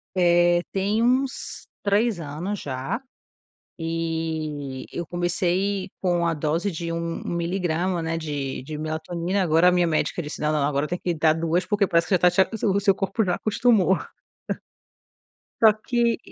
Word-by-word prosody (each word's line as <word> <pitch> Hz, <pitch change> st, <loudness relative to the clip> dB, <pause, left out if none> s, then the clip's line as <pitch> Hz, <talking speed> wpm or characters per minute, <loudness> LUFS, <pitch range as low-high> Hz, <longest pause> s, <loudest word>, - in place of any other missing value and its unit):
Eh, 175 Hz, -1 st, +4 dB
tem 200 Hz, +3 st, 0 dB
uns 255 Hz, +3 st, 0 dB
3 205 Hz, 0 st, +2 dB
anos 165 Hz, +7 st, -4 dB
já, 135 Hz, -, -3 dB, 0.8 s
eh, 160 Hz, -4 st, -3 dB
eu 170 Hz, -, -4 dB
comecei 180 Hz, +3 st, -1 dB
com 175 Hz, -2 st, +1 dB
a 170 Hz, -, +2 dB
dose 160 Hz, +6 st, -1 dB
de 165 Hz, +1 st, -4 dB
um 165 Hz, 0 st, -3 dB
um -, -, -5 dB
miligrama, 175 Hz, 0 st, -1 dB
né, 165 Hz, 0 st, -2 dB
de 145 Hz, -5 st, -4 dB
de 155 Hz, +3 st, -6 dB
melatonina, 165 Hz, +5 st, -2 dB
agora 165 Hz, +1 st, +4 dB
a -, -, +7 dB
minha 180 Hz, -1 st, +3 dB
médica 165 Hz, +1 st, 0 dB
disse 150 Hz, +1 st, -7 dB
não, 150 Hz, -, +1 dB
não, 150 Hz, -2 st, +1 dB
agora 145 Hz, +1 st, 0 dB
tem 175 Hz, -, -2 dB
que 175 Hz, -1 st, -2 dB
dar 155 Hz, 0 st, +3 dB
2, 165 Hz, +3 st, 0 dB
porque 205 Hz, 0 st, +2 dB
parece 170 Hz, -2 st, +2 dB
que 190 Hz, -, +3 dB
já -, -, +2 dB
tá 180 Hz, 0 st, +5 dB
te 190 Hz, -, +4 dB, 0.2 s
o 200 Hz, -1 st, +3 dB
seu 195 Hz, -2 st, +3 dB
corpo 195 Hz, +3 st, 0 dB
já 180 Hz, -3 st, +1 dB
acostumou. 215 Hz, -4 st, +3 dB, 1.6 s
Só 220 Hz, -1 st, +8 dB
que 235 Hz, +2 st, 0 dB
175 Hz, 165 wpm, -24 LUFS, 160-195 Hz, 1.6 s, Só